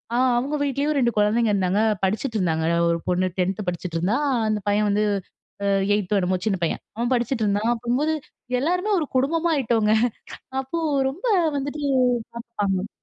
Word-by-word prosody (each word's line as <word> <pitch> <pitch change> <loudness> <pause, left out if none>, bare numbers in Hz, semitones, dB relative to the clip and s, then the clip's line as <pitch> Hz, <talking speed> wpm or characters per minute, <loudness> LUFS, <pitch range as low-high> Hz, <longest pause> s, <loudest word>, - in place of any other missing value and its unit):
ஆ - - +2 0.2
அவுங்க 275 +5 -1
வீட்லேயும் 285 +2 0
2 240 -3 +3
குழந்தைங்க 215 +2 +3
இருந்தாங்க. 190 0 +1 0.2
படிச்சுட்ருந்தாங்க. 190 - 0
அ - - +1
ஒரு 170 - 0
பொண்ணு 180 +1 +2
10த் 190 +3 -1
படிச்சுட்ருந்தா, 180 +3 -1 0.3
அந்த 215 -1 0
பையன் 210 +1 +2
வந்து 205 +1 +2 0.6
அ - - +1 0.3
8த் 205 -2 -1
என்னம்மோ, 185 -1 +1
சின்ன 205 -3 +1
பையன். 165 - -1 0.2
அவன் 240 +2 -1
படிச்சுட்ருந்தான். 225 -3 0
அப்போது 245 +6 0 0.5
எல்லாருமே 360 +8 0
ஒரு 315 - -1
குடும்பமா 325 +6 +2
ஆயிட்டோங்க. 225 -5 +2 0.7
அப்போ 265 +6 -4 0.3
ரொம்ப 345 - -7 0.3
வந்துட்டு 285 +2 -4 0.6
சாப்டாங்க. 205 -4 -2
220 Hz, 145 wpm, -23 LUFS, 195-270 Hz, 0.7 s, 2